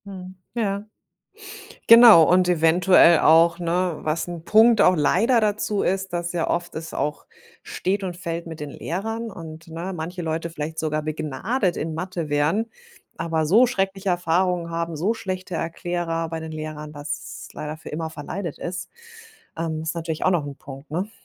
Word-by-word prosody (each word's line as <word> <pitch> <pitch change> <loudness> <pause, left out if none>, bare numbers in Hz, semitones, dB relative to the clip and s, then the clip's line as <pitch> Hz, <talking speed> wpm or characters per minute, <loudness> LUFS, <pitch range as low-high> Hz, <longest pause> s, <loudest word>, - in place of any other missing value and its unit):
Mhm. 185 -2 -9 0.2
Ja. 205 -3 -1 1.0
Genau 230 -7 +10
und 180 0 +4
eventuell 170 0 +5
auch, 165 +1 +5
ne, 175 -1 0
was 155 +2 -2
'n 170 -2 -7
Punkt 220 +2 +5
auch 185 - +5
leider 225 - +3
dazu 210 -1 0
ist, 190 0 -1
dass 175 0 -2
ja 170 -2 -1
oft 175 0 -2
es 160 0 -6
auch 150 0 -3 0.4
steht 195 +2 -2
und 180 -2 -4
fällt 170 -1 -5
mit 160 -1 -8
den 150 -1 -5
Lehrern 225 +10 -4
und, 160 -2 -10
ne, 165 +3 -5
manche 175 +2 -5
Leute 165 0 -3
vielleicht 160 0 -6
sogar 155 -1 -1
begnadet 155 - -2
in 160 +1 -3
Mathe 175 -1 -4
wären, 150 +10 +1 0.5
aber 165 -1 -1
so 215 +11 +6
schreckliche 195 -5 -1
Erfahrungen 175 0 +1
haben, 170 0 -3
so 185 +9 0
schlechte 185 -4 -5
Erklärer 165 0 -3
bei 165 0 -4
den 160 0 -7
Lehrern, 155 -1 -7
dass 145 0 -6
leider 155 +1 -6
für 160 - -11
immer 160 +1 -4
verleidet 160 +2 -6
ist. 175 +1 -5 0.7
Ähm, 160 -1 -3
ist 160 +1 -3
natürlich 165 -1 -3
auch 185 - +3
noch 170 -5 0
Punkt, 135 +1 -11
ne? 185 +7 -3
170 Hz, 165 wpm, -23 LUFS, 160-185 Hz, 1.0 s, Genau